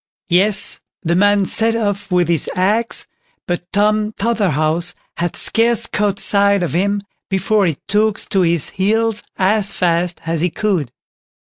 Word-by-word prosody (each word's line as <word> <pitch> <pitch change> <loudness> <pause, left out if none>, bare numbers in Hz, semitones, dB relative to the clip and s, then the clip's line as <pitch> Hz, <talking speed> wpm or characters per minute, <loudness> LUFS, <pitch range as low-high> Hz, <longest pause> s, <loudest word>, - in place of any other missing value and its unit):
Yes, 190 +4 +3 0.2
the 170 -1 0
man 205 +2 +3
set 225 +3 +1
off 205 -3 -2
with 180 -2 +2
his 165 -3 0
axe, 210 +5 0 0.4
but 175 0 -2
Tom 210 +1 +1
Totherhouse 175 -8 0 0.2
had 175 -1 -2
scarce 230 0 +2
caught 205 -1 -1
sight 200 -2 +3
of 170 - -3
him 200 +3 0 0.3
before 200 +1 +1
he 160 -4 -2
took 210 +1 +1
to 195 - +2
his 170 -4 +1
heels 220 +3 0 0.2
as 200 +2 +2
fast 175 0 0
as 165 -1 -2
he 180 - +1
could. 175 - -2
200 Hz, 145 wpm, -17 LUFS, 175-210 Hz, 0.4 s, Yes